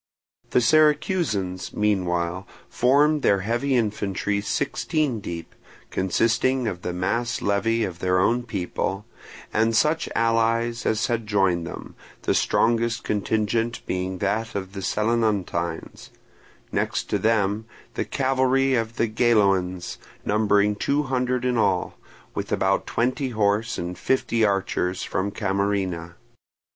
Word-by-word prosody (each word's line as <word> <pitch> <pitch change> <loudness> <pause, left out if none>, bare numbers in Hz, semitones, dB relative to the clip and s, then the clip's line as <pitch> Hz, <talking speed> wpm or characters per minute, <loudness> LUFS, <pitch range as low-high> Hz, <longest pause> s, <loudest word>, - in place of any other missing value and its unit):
The 125 - +3
Syracusans, 150 - +2
meanwhile, 90 -3 0 0.2
formed 145 +4 +3
their 100 -5 +3
heavy 120 +6 0
infantry 105 -3 -1
sixteen 135 +4 -1
deep, 85 -4 -7 0.4
consisting 115 +6 +1
of 90 -4 -4
the 90 - -3
mass 100 +7 -1
levy 115 +3 +1
of 90 -4 -4
their 90 0 +1
own 115 +6 +2
people, 100 -2 -3 0.5
and 115 +1 +2
such 155 +6 +2
allies 115 +1 +1
as 110 +1 +1
had 115 -2 -2
joined 95 -5 +1
them, 90 - -8 0.3
the - - +1
strongest 115 0 +1
contingent 110 +3 -1
being 95 0 -2
that 110 +4 -1
of 95 -1 -4
the 95 - -5
Selinuntines; 105 -6 -1 0.6
next - - -1
to - - +1
them 110 -1 +1 0.3
the - - -1
cavalry 135 0 +1
of 115 -2 -1
the 115 - +1
Geloans, 100 -6 +1 0.3
numbering 105 -1 +2
two 145 +7 +1
hundred 125 -2 -1
in 125 -1 +1
all, 90 -5 +1 0.4
with - - -4
about - - +1
twenty 130 +3 0
horse 110 0 0
and 90 +1 -4
fifty 115 -3 +1
archers 95 -2 0
from 95 +2 -1
Camarina. 95 -4 -1
110 Hz, 125 wpm, -24 LUFS, 95-120 Hz, 0.6 s, The